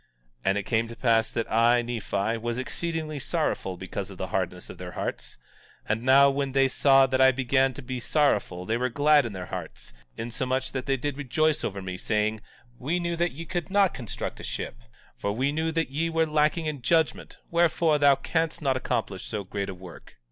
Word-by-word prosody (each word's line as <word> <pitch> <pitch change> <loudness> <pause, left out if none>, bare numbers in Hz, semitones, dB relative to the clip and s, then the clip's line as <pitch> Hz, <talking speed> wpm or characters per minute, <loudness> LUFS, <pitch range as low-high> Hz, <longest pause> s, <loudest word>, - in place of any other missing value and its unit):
17:19 - - -41
And 95 - +3
now - - +1
it - - -15
came 115 -1 +1
to 115 - -9
pass 115 -3 +2
that 115 - -3
I, 120 +2 +4
Nephi, 115 -2 -2
was 120 +1 -3
exceedingly 155 +2 -3
sorrowful 135 - -2
because 95 +1 -5
of - - -10
the - - -4
hardness - - -2
of - - -13
their - - -7
hearts; - - -5 0.5
and 105 +2 0
now 135 +3 +6
when 135 -1 -2
they 135 0 +4
saw 135 0 +5
that 130 0 +1
I 130 0 +7
began 130 0 +1
to 145 - -8
be 130 0 -4
sorrowful 105 - +1
they 115 +4 0
were 125 +1 0
glad 145 +1 +4
in 110 - -7
their 90 -2 -6
hearts, - - -7 0.2
insomuch 130 +3 -2
that 130 0 -4
they 135 -1 +2
did 140 +2 -3
rejoice 150 +2 +1
over 100 -1 -3
me, 95 -1 -5
saying: 110 0 0 0.4
We 160 +8 -1
knew 170 -1 -1
that 175 +1 0
ye 165 +5 -7
could 175 +2 -3
not 200 -2 +3
construct 120 -5 -6
a - - -9
ship, - - -5 0.4
for 100 - -2
we 130 +6 0
knew 160 +2 -1
that 165 -4 -1
ye 160 +4 0
were 165 0 +2
lacking 155 +1 +1
in 150 -4 -3
judgment; 160 +4 +1
wherefore, 170 -2 +3
thou 140 -1 +6
canst 165 +3 -1
not 135 -5 +1
accomplish 115 -7 -2
so 105 -2 -3
great 100 +1 -4
a 95 - -5
work. 90 -2 -13
130 Hz, 215 wpm, -26 LUFS, 115-155 Hz, 0.5 s, I